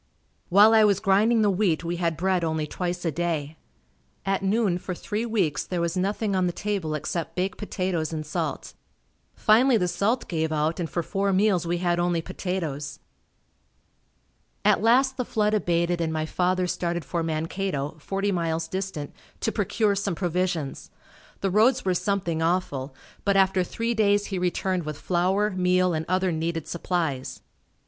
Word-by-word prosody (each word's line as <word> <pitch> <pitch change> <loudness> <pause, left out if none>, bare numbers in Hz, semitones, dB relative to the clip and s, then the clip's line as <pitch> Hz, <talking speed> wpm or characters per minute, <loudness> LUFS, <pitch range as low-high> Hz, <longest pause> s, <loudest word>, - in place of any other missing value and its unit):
While 205 +4 +7
I 220 -1 +6
was 200 -2 +4
grinding 215 +4 +3
the 205 - +4
wheat 185 -4 +1
we 170 +1 -2
had 170 -2 -1
bread 185 0 +1
only 160 -1 -1
twice 175 +3 -4
a 165 - +1
day. 160 -2 -2 0.7
At 195 0 0
noon, 195 -2 +1
for 180 0 -5
three 215 +6 -3
weeks, 190 -10 0
there 180 - -3
was 170 +1 -1
nothing 200 +2 0
on 185 -1 +2
the - - 0
table 195 -7 -2
except 155 +3 -4
baked 185 +1 -2
potatoes 185 -6 -2
and 155 -1 -4
salt. 150 - -3 0.6
Finally 235 +3 +4
the 180 -4 +1
salt 220 +8 0
gave 160 -2 -1
out 155 +2 0
and 165 -2 -2
for 170 - -2
four 195 +3 0
meals 190 -3 +2
we 175 +1 0
had 175 -1 0
only 175 -1 +1
potatoes. 165 -5 -4 1.7
At - - +4
last 260 +4 +3
the 250 - 0
flood 210 -2 0
abated 175 -3 +1
and 160 -1 0
my 155 0 -1
father 180 +2 0
started 175 -2 -2
for 170 +3 -2
Mankato, 160 -2 -2
forty 195 +5 -1
miles 165 -2 -1
distant, 185 -6 -4 0.3
to 225 - 0
procure 210 0 +1
some 200 -2 -1
provisions. 175 -4 -2 0.5
The 195 - 0
roads 230 +5 +3
were 185 - +2
something 180 -3 -1
awful, 150 -6 -1 0.3
but 200 -1 +2
after 190 -1 +3
three 230 +6 -2
days 205 -2 +2
he 185 - 0
returned 180 +1 0
with 155 -2 -5
flour, 190 +4 +1
meal 185 -1 +2
and 160 0 -2
other 185 0 +1
needed 165 0 -2
supplies. 165 -6 -2
180 Hz, 170 wpm, -25 LUFS, 165-200 Hz, 1.7 s, While